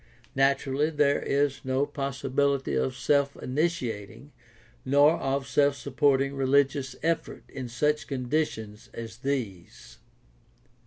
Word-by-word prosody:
Naturally 140 Hz, +2 st, +2 dB
there 145 Hz, -2 st, +2 dB
is 140 Hz, -1 st, 0 dB
no 130 Hz, +2 st, +1 dB
possibility 140 Hz, -, -1 dB
of 65 Hz, 0 st, 0 dB
self 140 Hz, -1 st, +1 dB
initiating 130 Hz, -, -3 dB, 0.5 s
nor 145 Hz, +4 st, +4 dB
of 135 Hz, 0 st, -1 dB
self 140 Hz, 0 st, +3 dB
supporting 140 Hz, -1 st, +1 dB
religious 135 Hz, -1 st, +1 dB
effort 165 Hz, 0 st, -1 dB
in 130 Hz, -2 st, -7 dB
such 150 Hz, +6 st, 0 dB
conditions 125 Hz, -6 st, -3 dB
as 115 Hz, -1 st, -7 dB
these. 95 Hz, -, -5 dB
135 Hz, 105 wpm, -27 LUFS, 125-145 Hz, 0.5 s, nor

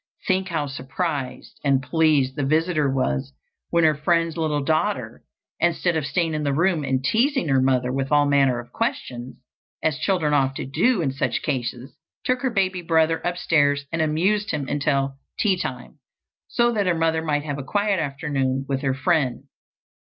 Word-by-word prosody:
Think 190 Hz, 0 st, +1 dB
how 160 Hz, -5 st, -1 dB
surprised 135 Hz, -1 st, -4 dB
and 140 Hz, -2 st, +3 dB
pleased 145 Hz, -2 st, +2 dB
the 145 Hz, -, -2 dB
visitor 155 Hz, +1 st, +1 dB
was 70 Hz, -, -1 dB, 0.4 s
when 170 Hz, 0 st, +2 dB
her 155 Hz, -1 st, +5 dB
friend's 165 Hz, +2 st, +1 dB
little 155 Hz, -3 st, -1 dB
daughter, 155 Hz, +2 st, -1 dB, 0.4 s
instead 175 Hz, 0 st, +1 dB
of 155 Hz, -3 st, -1 dB
staying 165 Hz, 0 st, 0 dB
in 155 Hz, -, -1 dB
the 140 Hz, -2 st, 0 dB
room 170 Hz, -1 st, +2 dB
and 130 Hz, -1 st, -1 dB
teasing 250 Hz, -, +1 dB
her 135 Hz, -1 st, +3 dB
mother 130 Hz, -1 st, +1 dB
with 135 Hz, +1 st, -2 dB
all 145 Hz, 0 st, +5 dB
manner 140 Hz, -3 st, +3 dB
of 120 Hz, 0 st, -8 dB
questions, 130 Hz, -, -3 dB, 0.5 s
as 155 Hz, -1 st, 0 dB
children 160 Hz, -4 st, +1 dB
often 135 Hz, -1 st, 0 dB
do 185 Hz, -, +2 dB
in 135 Hz, -, 0 dB
such 135 Hz, -, -2 dB
cases, 125 Hz, -2 st, -3 dB, 0.3 s
took 255 Hz, 0 st, +1 dB
her 260 Hz, -, +1 dB
baby 190 Hz, -5 st, 0 dB
brother 165 Hz, -1 st, +2 dB
upstairs 145 Hz, -5 st, +1 dB
and 160 Hz, -, -1 dB
amused 190 Hz, +7 st, +1 dB
him 145 Hz, -3 st, -2 dB
until 140 Hz, -1 st, 0 dB, 0.2 s
tea 200 Hz, -4 st, +2 dB
time, 135 Hz, -4 st, -6 dB, 0.5 s
so 240 Hz, 0 st, +2 dB
that 205 Hz, -4 st, 0 dB
her 180 Hz, -, +2 dB
mother 160 Hz, 0 st, +1 dB
might 150 Hz, -2 st, -1 dB
have 145 Hz, -2 st, -4 dB
a -, -, -4 dB
quiet 205 Hz, +4 st, 0 dB
afternoon 135 Hz, -3 st, -1 dB
with 135 Hz, -1 st, -1 dB
her 135 Hz, -2 st, 0 dB
friend. 135 Hz, -3 st, 0 dB
150 Hz, 175 wpm, -23 LUFS, 135-170 Hz, 0.5 s, her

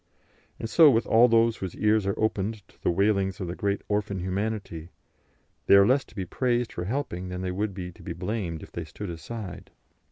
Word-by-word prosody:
And -, -, -3 dB
so 155 Hz, +6 st, +7 dB
with 115 Hz, -3 st, +2 dB
all 115 Hz, +2 st, +6 dB
those 115 Hz, -1 st, +3 dB
whose 95 Hz, -3 st, -5 dB
ears 105 Hz, -1 st, +2 dB
are 100 Hz, -, -1 dB
opened 110 Hz, -1 st, -1 dB
to -, -, -25 dB
the -, -, +1 dB
wailings 100 Hz, +1 st, +1 dB
of 95 Hz, -, -3 dB
the 85 Hz, -, -3 dB
great 100 Hz, -1 st, -1 dB
orphan 105 Hz, -1 st, -1 dB
Humanity; 95 Hz, -3 st, -3 dB, 0.8 s
they -, -, +8 dB
are 100 Hz, 0 st, +7 dB
less 130 Hz, +5 st, +3 dB
to -, -, -20 dB
be 95 Hz, -3 st, -3 dB
praised 120 Hz, +2 st, 0 dB
for 90 Hz, -, -4 dB
helping 95 Hz, -6 st, -3 dB
than 90 Hz, 0 st, -5 dB
they 95 Hz, -1 st, -2 dB
would 100 Hz, +1 st, -2 dB
be 90 Hz, -2 st, -5 dB
to -, -, -17 dB
be 90 Hz, -, -5 dB
blamed 85 Hz, -3 st, -4 dB
if -, -, -12 dB
they 85 Hz, -, -5 dB
stood 90 Hz, +5 st, -7 dB
aside. 95 Hz, +3 st, -7 dB
100 Hz, 215 wpm, -27 LUFS, 90-110 Hz, 0.8 s, they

